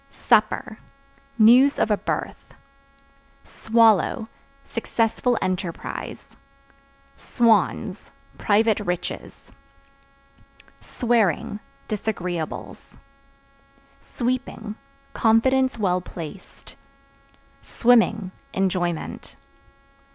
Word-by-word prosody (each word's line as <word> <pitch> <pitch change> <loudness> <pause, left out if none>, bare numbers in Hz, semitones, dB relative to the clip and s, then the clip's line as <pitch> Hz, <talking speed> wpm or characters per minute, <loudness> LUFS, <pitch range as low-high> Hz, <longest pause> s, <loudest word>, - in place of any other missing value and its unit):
Supper 215 +1 +1 0.6
News 245 +5 +6
of 215 - +1
a - - +5
birth. - - -5 0.9
Swallow 225 -1 +2 0.4
Successful 230 +1 -1
enterprise. 185 -2 -5 0.8
Swans 230 -4 +1 0.3
Private 215 +1 +2
riches. 180 -4 -5 1.3
Swearing 220 -4 0 0.3
Disagreeables. 180 -6 -5 1.1
Sweeping 245 -3 -3 0.4
Confidence 260 +3 +2
well 185 -4 0
placed. 175 +1 -11 0.9
Swimming 220 -5 +2 0.2
Enjoyment. 180 -3 -2
215 Hz, 55 wpm, -23 LUFS, 185-235 Hz, 1.3 s, News